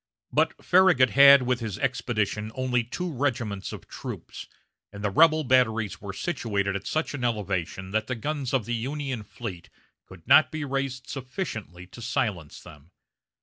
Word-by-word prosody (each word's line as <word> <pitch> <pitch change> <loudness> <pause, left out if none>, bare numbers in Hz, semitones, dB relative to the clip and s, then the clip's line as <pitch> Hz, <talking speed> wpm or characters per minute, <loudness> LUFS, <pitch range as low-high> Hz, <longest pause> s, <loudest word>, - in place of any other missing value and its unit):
But - - 0
Farragut 180 -9 +5
had 140 -1 +8
with 125 0 0
his 110 -5 -4
expedition 115 -5 -1
only 125 -2 0
two 170 +9 -5
regiments 120 -7 -2
of - - -9
troops, - - -8 0.4
and 100 +1 -9
the 105 - 0
rebel 155 +5 +5
batteries 110 -7 +1
were 100 -1 -5
situated 100 - -2
at 100 - -5
such 155 0 -1
an 135 -4 -5
elevation 95 -5 -2
that 110 +1 -1
the 130 - -2
guns 140 +2 -3
of 130 -6 0
the 120 - -3
Union 130 +1 -3
fleet 105 -5 -8 0.4
could 90 -3 -15
not 145 -4 +6
be 155 -1 -4
raised 135 -2 -3
sufficiently 125 - -6
to 95 +6 -13
silence 100 -9 -2
them. 75 +1 -15
120 Hz, 160 wpm, -26 LUFS, 100-135 Hz, 0.4 s, had